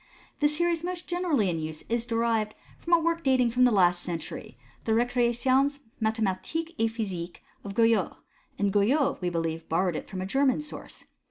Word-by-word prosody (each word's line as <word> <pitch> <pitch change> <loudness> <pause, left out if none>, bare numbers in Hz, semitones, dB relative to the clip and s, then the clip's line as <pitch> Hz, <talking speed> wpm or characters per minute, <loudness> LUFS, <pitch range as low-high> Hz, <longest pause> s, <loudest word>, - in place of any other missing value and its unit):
The 295 - +4
series 335 +2 0
most 360 0 -4
generally 345 - +1
in 170 -2 -1
use 155 0 -6
is 235 0 -1
derived 230 -2 0 0.2
from 340 - -2
a 340 - +7
work 335 0 0
dating 255 -3 +3
from 250 +2 +4
the 245 - +4
last 180 -4 +3
century, 165 -7 -6 0.3
the 220 - +2
Recreations 245 +4 +2 0.2
Mathematiques 220 - -1
et 225 0 +3
Physiques 190 -7 -4 0.2
of 200 -1 -7
Guyot 225 -5 +3
j - - -26 0.4
and 200 -1 0
Guyot, 245 +8 +2
we 180 - 0
believe, 165 -1 -3
borrowed 175 +1 +1
it - - -6
from 190 - -5
a 185 - -3
German 270 +7 +2
source. 300 - -9
230 Hz, 180 wpm, -27 LUFS, 190-280 Hz, 0.4 s, a